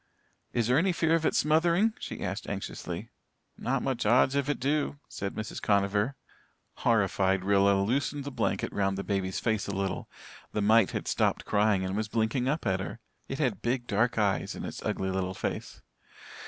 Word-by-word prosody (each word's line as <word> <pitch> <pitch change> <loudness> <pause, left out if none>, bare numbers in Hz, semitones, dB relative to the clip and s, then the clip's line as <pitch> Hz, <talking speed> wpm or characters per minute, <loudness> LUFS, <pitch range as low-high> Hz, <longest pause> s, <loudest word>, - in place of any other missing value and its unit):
"Is 120 -2 +1
there 125 +5 +4
any 190 +3 +2
fear 165 -1 +2
of 165 -1 +3
it - - 0
smothering?" 170 +8 +3
she - - -6
asked - - -4
anxiously. - - -5 0.4
"Not 130 +1 -1
much 130 -3 -1
odds 125 +5 +4
if 140 0 0
it 145 - 0
do," 145 +2 0
said 100 0 -5
Mrs. 110 0 -5
Conover. 100 +5 +1 0.6
Horrified 95 -4 +2
Rilla 100 0 +4
loosened 140 +6 0
the 140 - -5
blanket 115 -6 -1
round 95 -1 0
the 100 - -3
baby's 95 -2 -1
face 110 -3 0
a 100 - -3
little. 95 -1 -2 0.4
The 105 - 0
mite 110 -1 +5
had - - -4
stopped - - +1
crying 105 -2 +2
and 95 +1 -2
was 110 0 -1
blinking 115 +3 0
up 150 0 -1
at 95 -2 +1
her. 100 +4 -5 0.3
It 135 - -4
had 125 -11 0
big 120 +1 -1
dark 115 +2 +1
eyes 100 -3 +1
in - - -5
its - - -6
ugly 95 0 -1
little 95 0 -2
face. - - -4
110 Hz, 185 wpm, -29 LUFS, 100-135 Hz, 0.6 s, mite